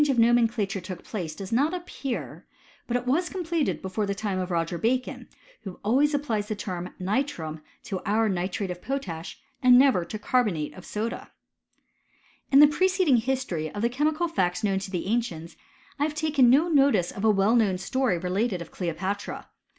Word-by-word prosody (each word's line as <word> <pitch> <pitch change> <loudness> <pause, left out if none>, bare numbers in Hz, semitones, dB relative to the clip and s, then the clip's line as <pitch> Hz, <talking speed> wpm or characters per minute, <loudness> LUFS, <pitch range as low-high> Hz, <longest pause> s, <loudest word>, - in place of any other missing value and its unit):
When - - +5
this 275 -3 +1
change - - -6
of 230 - +6
nomenclature 225 -5 +1
took 180 -1 -8
place 170 -8 -5
does 195 +1 -7
not 285 +9 +2
appear; 285 -7 -6 0.4
but 245 - +1
it 245 - -6
was 320 +8 +1
completed 335 - -2
before 195 +2 -2
the 200 - -1
time 200 -2 -2
of 185 0 -3
Roger 170 -1 -1
Bacon, 250 +3 -1 0.3
who 190 -3 -9
always 275 +8 +3
applies 225 -8 -1
the 215 - -2
term 180 -3 -5
nitrum 185 - -2 0.2
to 190 -2 -4
our 220 +2 +2
nitrate 185 0 -2
of 180 0 -7
potash 195 -11 -5 0.2
and 250 -1 +7
never 260 -9 +5
to 215 - -6
carbonate 210 -9 0
of 185 - -12
soda. 220 +2 -4 1.2
In 275 +1 +8
the 295 - +10
preceding 370 -2 +3
history 225 -10 -2
of 205 - -4
the 235 - +3
chemical 305 +6 0
facts 185 - -1
known 195 -2 +1
to 195 - -6
the 180 -3 -3
ancients, 190 -7 -2 0.4
I - - +2
have 300 0 -3
taken 300 -5 +3
no 290 +7 +5
notice 275 - +3
of 200 - -7
a 220 - +5
well 205 +2 +3
known 205 -6 +3
story 245 0 0
related 185 +3 -1
of 170 - -9
Cleopatra. 190 +3 -4
215 Hz, 190 wpm, -26 LUFS, 185-270 Hz, 1.2 s, the